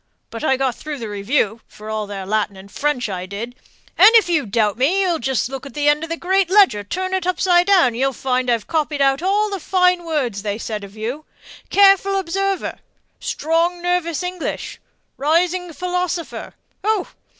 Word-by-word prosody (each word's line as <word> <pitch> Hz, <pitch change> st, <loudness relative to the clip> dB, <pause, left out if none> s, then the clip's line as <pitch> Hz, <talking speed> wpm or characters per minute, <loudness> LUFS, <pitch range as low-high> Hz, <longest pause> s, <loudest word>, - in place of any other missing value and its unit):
But 230 Hz, -, -7 dB
I 265 Hz, -4 st, +2 dB
got 265 Hz, -2 st, 0 dB
through 300 Hz, +3 st, -6 dB
the 230 Hz, -4 st, -6 dB
review, 215 Hz, +2 st, -1 dB
for 215 Hz, -, -13 dB
all 215 Hz, -1 st, -3 dB
their 195 Hz, -2 st, -6 dB
Latin 205 Hz, -1 st, -1 dB
and 195 Hz, +1 st, -13 dB
French 290 Hz, -3 st, -1 dB
I 185 Hz, -2 st, -5 dB
did; 215 Hz, +5 st, -6 dB, 0.5 s
and 405 Hz, -, +10 dB
if 445 Hz, -5 st, +6 dB
you 315 Hz, -8 st, +1 dB
doubt 210 Hz, 0 st, +1 dB
me, 320 Hz, -, +2 dB
you 350 Hz, -3 st, 0 dB
just 260 Hz, -1 st, 0 dB
look 270 Hz, 0 st, -7 dB
at 275 Hz, -, -11 dB
the 295 Hz, 0 st, 0 dB
end 295 Hz, +1 st, +4 dB
of 325 Hz, -, -5 dB
the 330 Hz, -, -3 dB
great 380 Hz, +1 st, +1 dB
ledger, 375 Hz, -, +4 dB
turn 370 Hz, -, -3 dB
it 375 Hz, -2 st, -1 dB
upside 360 Hz, -1 st, +3 dB
down, 370 Hz, -10 st, +5 dB
and 230 Hz, -, -7 dB
you'll 270 Hz, +2 st, +1 dB
find 255 Hz, 0 st, -1 dB
I've 230 Hz, -3 st, +1 dB
copied 305 Hz, -2 st, -1 dB
out 275 Hz, +1 st, +2 dB
all 410 Hz, +3 st, +1 dB
the 395 Hz, -, -3 dB
fine 360 Hz, 0 st, +2 dB
words 270 Hz, -11 st, -2 dB
they 205 Hz, 0 st, -3 dB
said 215 Hz, -2 st, -5 dB
of 200 Hz, +2 st, -11 dB
you: 245 Hz, +8 st, -4 dB, 0.4 s
'careful 390 Hz, 0 st, +5 dB
observer,' 390 Hz, +1 st, -2 dB, 0.4 s
'strong 335 Hz, +3 st, 0 dB
nervous 355 Hz, -1 st, -1 dB
English,' 360 Hz, -1 st, -4 dB, 0.4 s
'rising 345 Hz, +4 st, +1 dB
philosopher.' 360 Hz, 0 st, -3 dB, 0.3 s
Oh! 425 Hz, -2 st, 0 dB
305 Hz, 190 wpm, -20 LUFS, 230-360 Hz, 0.5 s, and